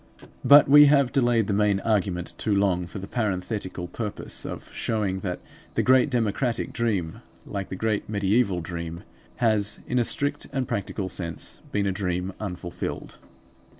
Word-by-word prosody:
But 145 +1 +8
we 145 +2 +9
have 140 -3 +4
delayed 120 -5 +3
the 100 - -1
main 100 -1 +2
argument 95 -5 0
too 105 -2 +1
long 95 -3 +1
for 85 - -8
the 95 - -6
parenthetical 95 -4 -3
purpose 105 +2 -5
of - - -8
showing 105 -4 -1
that 90 -3 -4 0.4
the - - +2
great 130 +2 +5
democratic 120 0 -1
dream, 100 -9 -1 0.2
like 100 -2 -5
the - - -4
great 110 +1 -1
mediaeval 100 -2 +1
dream, 85 +1 -6 0.3
has 110 -3 +1
in 125 - 0
a - - +3
strict 145 +5 -1
and 130 -3 -2
practical 100 -3 -3
sense 85 -4 -5
been 105 -1 0
a 100 - +1
dream 90 -1 -2
unfulfilled. 90 -4 -5
100 Hz, 155 wpm, -25 LUFS, 95-120 Hz, 0.4 s, we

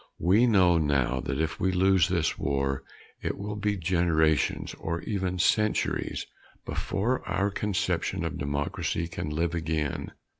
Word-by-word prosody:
We 100 +9 +4
know 90 -6 +5
now 70 -4 +1
that 70 +2 -3
if 80 -1 -1
we 95 - +2
lose 95 -2 +4
this - - 0
war 70 -1 -1 0.4
it - - -2
will 105 +1 -4
be 105 0 -1
generations 80 -3 +1
or 85 +1 -3
even 95 -2 -2
centuries 105 +4 +1 0.4
before 110 +7 -1
our 95 +3 0
conception 100 -2 -1
of - - -4
democracy 70 +3 -2
can 80 -2 -5
live 85 +2 -1
again. 80 -3 -2
85 Hz, 140 wpm, -28 LUFS, 75-95 Hz, 0.4 s, know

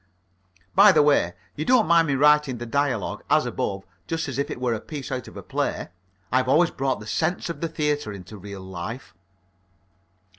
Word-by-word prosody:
(By 200 +2 +8
the 155 -5 +5
way, 140 -12 +3 0.2
you 150 - -3
don't 245 +2 +4
mind 165 -1 +4
me 140 - +1
writing 150 -2 +4
the 120 - -6
dialogue, 130 -4 -1
as - - +4
above, 95 -1 -3 0.2
just 165 -1 -2
as 135 0 -4
if 140 - -1
it - - -5
were 125 -2 0
a 110 - -4
piece 145 -4 -7
out 130 -2 -4
of - - -11
a - - -8
play? - - -2 0.4
I've 130 0 +2
always 165 +5 +4
brought 130 -4 -1
the 105 - -10
sense 170 - -1
of 150 - -9
the 165 - -1
theatre 150 -7 -1
into 100 +1 -10
real 100 0 -8
life.) 95 +5 -7
135 Hz, 195 wpm, -24 LUFS, 110-155 Hz, 0.4 s, By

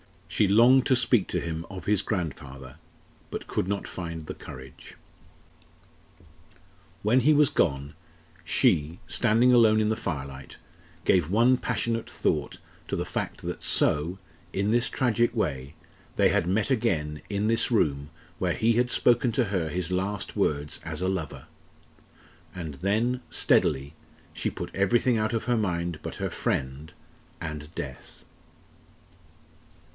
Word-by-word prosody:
She 105 - +2
longed 120 +6 +6
to 130 - +4
speak 120 -4 +3
to 90 - -2
him 80 -1 -4
of 95 -4 -8
his 105 -2 +2
grandfather 70 - -5 0.5
but - - -5
could - - -2
not 100 0 -2
find 85 -3 -6
the - - -5
courage. 65 0 -11 2.1
When 115 +5 +4
he 145 +5 +4
was 145 -1 +5
gone, 70 -3 0 0.5
she, 80 +3 +1
standing 115 +4 +3
alone 110 -3 +6
in 110 0 +2
the 110 - +1
firelight, 70 - -6 0.5
gave 85 -4 +3
one 120 +6 +4
passionate 115 -2 -2
thought - - -1 0.3
to - - -2
the - - -2
fact - - -4
that - - -5
so 80 +6 +1 0.4
in 100 +2 0
this 120 0 +2
tragic 120 -1 +1
way 70 - -2 0.4
they - - +4
had 85 - +1
met 105 +7 +1
again 80 - 0
in 100 0 -1
this 115 +3 +2
room 70 - +1 0.3
where 90 -2 +1
he 115 +1 +2
had 120 +2 +2
spoken 120 +1 +3
to 125 - +2
her 95 -6 -1
his 90 +2 -3
last 95 +2 -2
words 75 0 -1
as - - -5
a 95 - +1
lover; 90 -6 -4 1.1
and 80 -5 -6
then, 110 - 0
steadily, 70 +2 +2 0.4
she - - -2
put - - -7
everything 115 +5 +2
out 110 +1 0
of 115 - -1
her 120 -1 +2
mind 85 -6 -1
but - - -6
her - - -3
friend 65 +4 -3 0.5
and 75 0 -7
death. 65 -3 -8
95 Hz, 145 wpm, -27 LUFS, 75-115 Hz, 2.1 s, longed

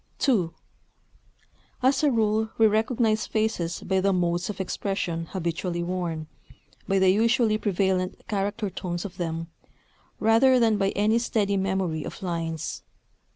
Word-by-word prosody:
II 200 -11 +3 1.3
As 265 +2 +3
a 295 - +5
rule 220 -2 +1
we 225 - +5
recognize 220 0 +2
faces 215 -6 -1
by 190 0 +1
the 195 +1 +2
modes 175 0 0
of 200 -2 -5
expression 180 -3 -2
habitually 170 0 -2
worn, 170 -3 -3 0.6
by 195 - +2
the 190 -1 +5
usually 225 +1 +2
prevalent 190 -2 0
character 205 0 -2
tones 175 0 -4
of 190 -2 -8
them, 165 -1 -4 0.7
rather 245 +4 +5
than 220 -3 +3
by 195 0 +2
any 215 +3 +3
steady 210 -4 0
memory 190 -5 -1
of - - -8
lines. 165 -3 -3
195 Hz, 135 wpm, -26 LUFS, 175-220 Hz, 1.3 s, a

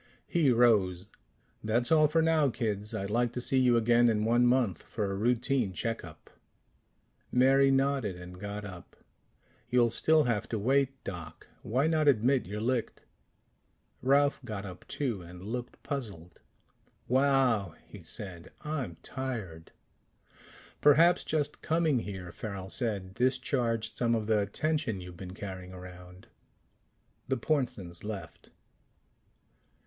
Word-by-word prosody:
He 165 -6 +2
rose. 105 -6 +3 0.5
"That's 120 +4 +1
all 155 -1 +6
for 160 +2 +2
now, 160 -3 +3
kids. 105 -2 -2
I'd 100 -1 -3
like 120 +1 +1
to - - -3
see 130 +2 +1
you 125 -2 +4
again 120 +1 +4
in 105 -1 +1
one 120 +2 +4
month 120 -8 +2
for 105 -3 -3
a - - -2
routine 120 0 +1
check 115 +6 -3
up." 85 -3 -13 1.0
Mary 135 +2 +5
nodded 135 -7 +1
and 90 0 -10
got 105 +1 -5
up. 90 -3 -10 0.7
"You'll 120 -2 +3
still 155 +6 +3
have 115 -3 -1
to 115 - -1
wait, 135 +4 +1
Doc. 85 -4 -8 0.2
Why 130 +6 0
not 155 -2 +2
admit 130 -1 +3
you're 105 +2 -4
licked?" 120 +1 -1 1.0
Ralph 140 +3 +3
got 105 -2 -5
up 90 -2 -10
too, 120 -9 -2
and 90 +1 -11
looked 120 +4 -6
puzzled. 100 - -6 0.7
"Wow," 130 - +2
he - - -12
said. 90 -4 -7
"I'm 140 - -4
tired." 110 -12 -5 1.1
"Perhaps 160 +4 +5
just 150 -1 -1
coming 160 -5 +2
here," 95 -5 -6
Farrel 95 -1 -6
said, 100 -6 -1
"discharged 125 -2 0
some 120 -1 +2
of 110 -2 -2
the 105 -1 +2
tension 150 - -1
you've 90 -1 -9
been 90 0 -8
carrying 95 -3 -7
around." 90 0 -11 1.0
The 130 - 0
Pornsens 125 - -2
left. 105 -2 -7
115 Hz, 135 wpm, -30 LUFS, 95-135 Hz, 1.1 s, all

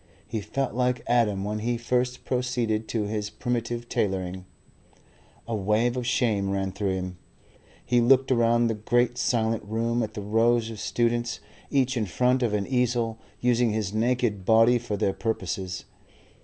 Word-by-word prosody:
He 110 - -4
felt 135 +6 -2
like 125 0 0
Adam 110 -5 +2
when 105 +1 -2
he 120 +2 -1
first 125 +1 -1
proceeded 120 -3 -1
to 110 -2 -1
his 105 0 -3
primitive 120 0 -3
tailoring. 95 -3 -2 1.0
A 115 - -2
wave 110 +4 +1
of 125 -2 -3
shame 110 -6 +1
ran 95 -1 -1
through 100 0 -1
him. 90 -1 -4 0.7
He 120 -1 +3
looked 130 +2 +4
around 120 -1 +3
the 115 - +1
great 120 +3 +1
silent 115 -2 +1
room, 115 +3 -1
at 110 - -4
the 105 - -4
rows 115 +2 +2
of 110 - -8
students, 120 0 0 0.3
each 130 -2 +1
in 110 -3 0
front 125 +7 +2
of 115 -4 +1
an 100 -1 -1
easel, 120 -3 0 0.2
using 120 -2 +2
his 105 -2 -2
naked 115 -3 0
body 115 +4 +5
for 115 -3 -4
their 100 -2 +1
purposes. 95 -4 -3
115 Hz, 160 wpm, -26 LUFS, 105-120 Hz, 1.0 s, body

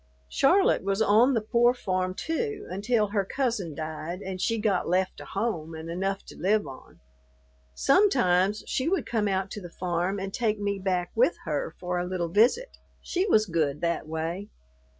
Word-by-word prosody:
Charlotte 370 - +3
was 195 +1 0
on 220 +5 +4
the 225 - +1
pore 240 +3 +3
farm 185 -4 -2
too, 420 - -3
until 215 +3 +1
her 200 -1 +1
cousin 205 - -2
died 160 +3 -5
and 185 -1 -5
she 230 +2 +1
got 210 -6 0
left 185 +1 0
a - - -9
home 175 -7 -3
and 160 +1 -7
enough 195 +3 -2
to - - -12
live 210 +2 +1
on. 135 -2 -12 0.8
Sometimes 200 - +3
she 270 +5 -1
would 385 -1 0
come 220 -3 0
out 190 -1 -1
to 210 - -6
the 175 - -8
farm 180 +2 -2
and 195 0 -5
take 220 -3 0
me 200 -1 -1
back 185 -2 -1
with - - +3
her - - -2
for 180 0 -2
a 175 - -2
little 180 -2 -2
visit. 245 - +2 0.2
She 370 +3 -1
was 215 - +4
good 155 -5 -1
that 170 -2 -1
way. 165 +5 -4
195 Hz, 180 wpm, -27 LUFS, 180-230 Hz, 0.8 s, on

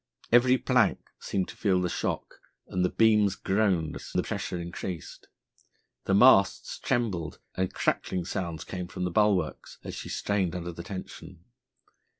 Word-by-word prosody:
Every 125 +2 +6
plank - - +1
seemed 95 -2 -2
to - - -9
feel 95 -4 +2
the 90 - 0
shock, - - -3 0.3
and 90 - -1
the 90 - +3
beams 105 -3 +4
groaned 95 -7 +1
as - - -10
the - - 0
pressure 90 - -3
increased. 85 -1 -6 0.8
The 95 - +2
masts 100 -3 +5
trembled, 100 -10 -1 0.2
and 95 0 -1
crackling 90 -2 -1
sounds 85 -4 -4
came 90 -2 -5
from 90 - -5
the 90 - -1
bulwarks 105 0 +1
as - - -6
she - - -7
strained 95 -4 -1
under 85 0 -4
the 85 - -8
tension. 90 -1 -9
95 Hz, 150 wpm, -28 LUFS, 85-105 Hz, 0.8 s, Every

